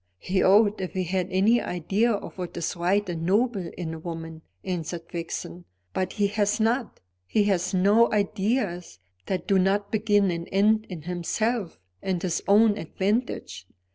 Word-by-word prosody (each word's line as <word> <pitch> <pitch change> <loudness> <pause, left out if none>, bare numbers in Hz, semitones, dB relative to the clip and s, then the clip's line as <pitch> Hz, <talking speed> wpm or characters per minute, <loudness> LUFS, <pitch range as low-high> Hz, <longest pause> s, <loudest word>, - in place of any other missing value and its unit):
"He 185 - 0
ought, 205 +1 +4
if 185 - -4
he 185 - -1
had 180 0 -1
any 205 +6 +3
idea 195 +7 0
of 205 - -4
what 180 -1 -5
is 170 - -2
right 190 +4 +1
and 170 -2 -4
noble 200 +1 +1
in 165 -3 -4
a 160 - -7
woman," 165 -1 -7 0.2
answered 175 -2 -4
Vixen. 170 +1 -5 0.3
"But 185 - -2
he 205 - +1
has 205 +1 0
not. 230 +2 0 0.3
He 210 - +2
has 190 -3 +1
no 205 +5 +4
ideas 200 - -1 0.3
that 185 -3 -2
do 195 -1 +4
not 200 +2 +1
begin 205 -3 +2
and 170 0 -5
end 215 +3 +3
in 170 -5 -7
himself 180 +4 -2 0.2
and 185 -2 -1
his 170 -2 -1
own 210 +1 +5
advantage. 195 - -2
190 Hz, 165 wpm, -26 LUFS, 175-210 Hz, 0.3 s, own